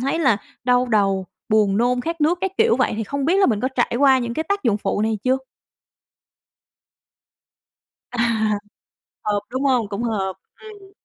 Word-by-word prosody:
thấy 275 +6 -1
là 265 -10 +3 0.3
đau 250 0 +3
đầu, 195 -4 +1 0.2
buồn 210 -3 +3
nôn, 245 +2 +2
khát 330 +5 -4
nước, 325 +4 +2
các 385 - -1
kiểu. 455 0 +4
Vậy - - +1
thì 225 - -2
không 280 +5 -3
biết 345 +5 +2
là 390 - +5
mình 215 -4 +1
có 255 - 0
trải 245 -3 -1
qua 270 -1 +5
những 235 -1 -3
cái 315 - -1
tác 400 -2 0
dụng 225 -5 +2
phụ 200 0 -1
này 220 -1 0
chưa? 260 +1 +2 2.7
À. 245 - -3 1.0
Hợp, 205 -1 0
đúng 260 +2 -3
hông? 250 -6 +2
Cũng 200 +3 -4
hợp. 200 -5 -1 0.3
Ừm. 410 -3 -13
245 Hz, 180 wpm, -21 LUFS, 215-285 Hz, 2.7 s, là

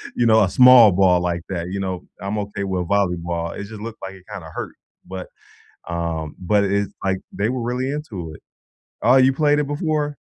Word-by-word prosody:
You 120 - +1
know, 110 -1 +5
a 95 - +1
small 125 0 +8
ball 90 -1 +3
like 85 -1 -2
that, 85 -3 -3
you 100 +1 -4
know, 95 -2 -4 0.2
I'm 100 +3 -3
okay 100 -1 -4
with 95 -3 -2
volleyball, 85 -4 -1
it - - -5
just 110 +1 -10
looked 115 0 -8
like 95 0 -7
it 95 - -16
kinda 95 -6 -8
hurt, - - -6 0.3
but, 95 -1 -7 0.6
um 85 -3 -3
but 100 +3 +2
it's 100 0 0
like, 95 -1 0
they 105 +3 -1
were 125 0 -2
really 125 +3 -2
into 105 - -6
it. - - -14 0.6
Oh, 125 +4 +5
you 130 0 +5
played 150 +1 +2
it 150 - 0
before? 150 0 -2
100 Hz, 205 wpm, -21 LUFS, 90-120 Hz, 0.6 s, small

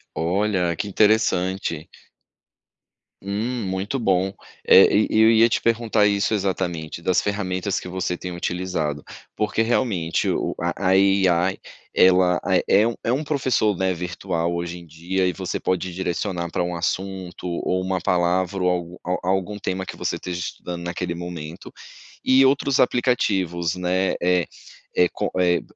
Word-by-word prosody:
Olha, 90 0 0
que 100 - -4
interessante. 95 -5 +1 1.3
Hum, 110 +5 -3
muito 95 +7 -2
bom. 95 -3 +1 0.3
É, 95 - +7
e 105 +2 +3
eu 110 +1 +7
ia 115 +1 +6
te - - 0
perguntar 115 -2 +2
isso, 100 +1 +1
exatamente, 90 -5 -2
das 90 +1 +2
ferramentas 100 -1 -2
que - - -9
você 90 -1 -3
tem 90 -1 -6
utilizado, 85 -4 -2 0.3
porque 105 +1 0
realmente, 110 -8 0
o - - -1
a 95 -1 -1
a 95 - +5
IA 95 -2 +3 0.4
ela, 90 -1 +4
ah, 95 - +1
é 105 +3 +5
um 115 - -2
é 115 - 0
um 145 +4 -1
professor, 130 - +1
né, 95 0 +1
virtual 85 0 -3
hoje 85 0 -4
em 85 - -13
dia, 85 +4 -2
e 90 - +1
você - - -4
pode 95 -1 -2
direcionar 90 -1 -3
para - - 0
um 90 0 -3
assunto, 90 +1 -4
ou 90 +1 -1
uma 95 -1 -2
palavra, 90 +2 +1
ou 90 - +3
algu 90 0 -3
a 90 0 -2
algum 95 +2 -1
tema 95 -2 -3
que - - -7
você - - -2
esteja 90 -1 -5
estudando 85 0 -6
naquele 85 0 -3
momento, 85 -1 -7 0.5
e 130 +1 +6
outros 135 0 +2
aplicativos, 95 -10 +1
né. 90 +1 0
Eh, 90 -1 +2 0.5
é 90 - +5
co - - -3
eh, 90 -1 +3
95 Hz, 155 wpm, -23 LUFS, 90-100 Hz, 1.3 s, É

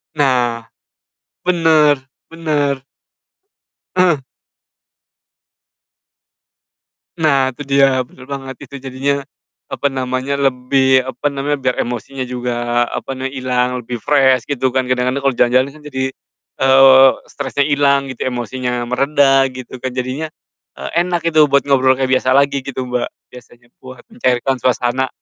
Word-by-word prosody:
Nah, 125 -5 +1 0.8
bener 160 -5 +3 0.3
bener. 145 -5 -1 1.1
Heeh. 175 -7 +2 2.9
Nah, 135 -5 +2
itu 145 - -7
dia 135 -2 +3
bener 125 +1 -16
banget, 135 -1 -6
itu 140 - -11
jadinya, 135 +1 -2 0.5
apa 140 - 0
namanya, 130 0 -2
lebih 130 -1 +2
apa 145 +2 -2
namanya, 140 +1 -1
biar 125 -1 +1
emosinya 125 +2 -4
juga 120 -1 -1
apa 135 - -5
nama 130 +1 -4
hilang 125 -1 -1
lebih 120 +1 -5
fresh 130 -4 +3
gitu 130 -2 0
kan 130 - +2
kadang-kadang 125 +2 -1
kalo 135 - +3
jalan-jalan 130 +2 +2
kan - - -18
jadi, 130 -1 -2 0.5
eee, 135 0 +7 0.2
stresnya 140 0 -1
ilang 140 -1 +2
gitu, 130 - -4
emosinya 125 0 -3
mereda 135 +2 +3
gitu 130 -1 -9
kan 130 +1 -4
jadinya, 130 +5 -3 0.5
eee, - - -6 0.2
enak 175 -2 -2
gitu 155 -1 +5
buat 140 0 +2
ngobrol 130 -2 +3
kayak 130 0 -1
biasa 130 0 +1
lagi 140 0 +3
gitu, 130 -1 -4
Mbak, 125 -1 -2 0.2
biasanya 120 -1 -16
buat 130 -1 -12
mencairkan 135 - 0
suasana. 125 +1 0
130 Hz, 130 wpm, -17 LUFS, 125-140 Hz, 2.9 s, eee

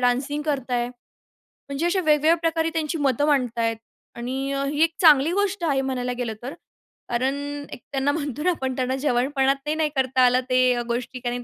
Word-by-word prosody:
Dancing 260 +4 0
करत 275 -4 -2
आहे. 240 -1 0 0.6
म्हणजे 280 +4 -5
अशा 370 +2 +2
वेगवेगळ्या 310 0 +4
प्रकारे 325 -1 +1
त्यांची 320 0 -1
मतं 280 -1 +1
मांडत 250 -5 +1
आहेत. 225 -1 0 0.4
आणि 260 +3 -3
अ, 275 0 -1
ही 290 +2 -1
एक 330 0 +1
चांगली 305 -2 +6
गोष्ट 400 -1 0
आहे 270 -2 +2
म्हणायला 250 -2 -2
गेलं 240 -3 -2
तर. 260 +4 -5 0.6
कारण 255 +3 0 0.4
एक - - -8
त्यांना 275 +1 +1
म्हणतो 290 -2 -3
ना 365 - +3
आपण 265 -7 -2
त्यांना 255 0 -1
जवानपणात 270 0 +1
ते 300 - 0
नाही 315 -1 +1
करता 260 -1 +1
आलं 250 +1 +4
ते 255 -1 +3
गोष्टी 245 +2 -3
कारण, 245 0 -3
270 Hz, 190 wpm, -24 LUFS, 250-300 Hz, 0.6 s, चांगली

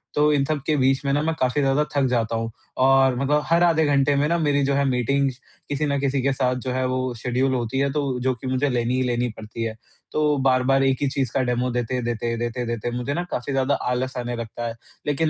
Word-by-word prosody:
तो 150 +1 +4
इन 140 -1 +2
सबके 155 0 -1
बीच 135 +1 +2
में 140 - +1
ना 145 - +2
मैं 160 0 0
काफ़ी 130 +3 +1
ज़्यादा 135 +2 +2
थक 140 -1 +3
जाता 115 -2 0
हूँ 115 0 -2 0.3
और 135 -1 +5
मतलब 145 +2 +2
हर 170 +1 +3
आधे 160 -2 +4
घंटे 140 0 +3
में 145 +2 +2
ना 170 +1 +1
मेरी 145 -3 +2
जो 140 - +1
है 140 - +2
मीटिंग्स 130 +1 0 0.3
किसी 145 +1 -1
ना 140 -1 0
किसी 140 -1 0
के 135 +1 +1
साथ 130 -1 0
जो 130 - -1
है 130 0 0
वो 130 0 -1
शड्यूल 130 +2 +1
होती 120 +1 -1
है 140 0 +1
तो 140 -3 -1
जो 130 0 +1
कि 125 +2 -8
मुझे 130 +2 +1
लेनी 120 0 0
ही 130 - +1
लेनी 120 0 0
पड़ती 110 +1 -6
है, 110 -1 -3 0.4
तो 150 -1 +2
बार-बार 135 0 +3
एक 135 -1 +2
ही 145 - +2
चीज़ 135 -4 -1
का - - +2
डेमो 125 0 0
देते-देते, 120 -1 -2
देते-देते 120 0 -3
मुझे 125 +3 -2
ना 175 +4 -1
काफ़ी 125 +3 -3
ज़्यादा 135 +1 +2 0.2
आलस 130 +1 -2
आने 120 0 -3
लगता 115 0 -5
है। 115 - -5 0.3
लेकिन 150 +2 +1
130 Hz, 240 wpm, -23 LUFS, 125-140 Hz, 0.4 s, और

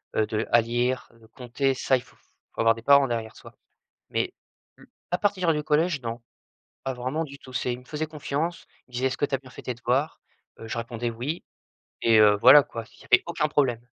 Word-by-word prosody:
heu 110 - +3
de 110 +1 -2
à 120 - +6
lire, 120 +3 -1
de 115 -1 -20
compter, 130 +3 -1
ça, 130 0 +2
il 125 - -7
faut - - -23 0.4
avoir 115 0 +4
des 115 - -10
parents 140 +2 +5
derrière 115 -2 -4
soi. - - -14 0.5
Mais - - -1 0.4
le - - -19 0.2
à 180 - +2
partir 185 -5 +1
du 150 - -1
collège 150 -1 +1
non, 115 0 -5 0.6
pas 135 - -2
vraiment 130 +6 -2
du 140 -2 -9
tout. 130 - -13
C'est 125 -1 -1
il 125 - -7
me 125 - -19
faisait 155 +3 -4
confiance, 155 +2 -3 0.2
il - - -26
me - - -22
disait: 125 +2 -1
«Est-ce 130 - -4
que - - +1
tu 140 - -1
as - - -1
bien 130 0 -16
fait - - -11
tes 125 - -3
devoirs?» 130 +6 -1 0.4
Heu, 115 - -8
je 115 - -4
répondais: 115 0 -3
«Oui» 130 +9 -4 0.6
et 115 -1 +5
heu, 105 -1 +7
voilà 135 +4 +9
quoi, 115 -3 -7
il - - -18
y - - -15
avait 125 - +5
aucun 165 -3 0
problème. 125 -6 0
130 Hz, 230 wpm, -26 LUFS, 115-145 Hz, 0.6 s, voilà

